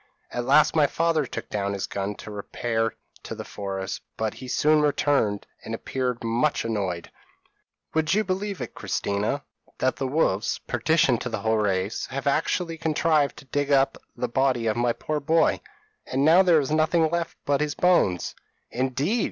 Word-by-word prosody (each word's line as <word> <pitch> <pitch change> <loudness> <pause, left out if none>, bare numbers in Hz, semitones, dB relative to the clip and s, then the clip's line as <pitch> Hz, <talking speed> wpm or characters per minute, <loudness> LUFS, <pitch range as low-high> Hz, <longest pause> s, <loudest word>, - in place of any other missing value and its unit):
p> - - -4
"At 120 - -2
last 150 +5 +5
my 150 -2 +5
father 160 -2 +1
took - - -6
down 100 -1 -1
his 100 - -2
gun 100 +1 -3
to 105 - -9
repair 115 +2 -2 0.3
to - - -7
the - - -6
forest; 95 -1 -5 0.2
but 110 -1 -1
he 130 - -9
soon 150 +4 +3
returned, 140 -8 +1 0.2
and 115 - -4
appeared 125 0 -3
much 120 +6 +1
annoyed. 95 -6 -2 0.8
"'Would 160 +3 +2
you 215 - +3
believe 195 -2 -3
it, 125 - -5
Christina, 100 +7 -2 0.3
that 130 0 0
the 135 - -1
wolves 130 -8 +1
perdition 130 0 +2
to 125 - -4
the 110 -3 -3
whole 110 +1 +2
race 100 -1 0
have 135 0 -5
actually 165 +3 0
contrived 155 -3 +2
to - - -12
dig 145 +1 -1
up 135 -1 +4 0.2
the 125 - -2
body 130 -1 +1
of 110 - +1
my 120 0 +2
poor 155 +4 -3
boy, 160 +4 +2 0.5
and 135 +2 +1
now 165 +4 +7
there 175 -4 +5
is 140 0 -2
nothing 155 +2 +3
left 170 -1 -1
of - - -40
him - - -51
but 140 0 +1
his 150 -1 -1
bones?' 170 - +2 0.4
"'Indeed!' 135 - 0
135 Hz, 185 wpm, -25 LUFS, 110-155 Hz, 0.8 s, now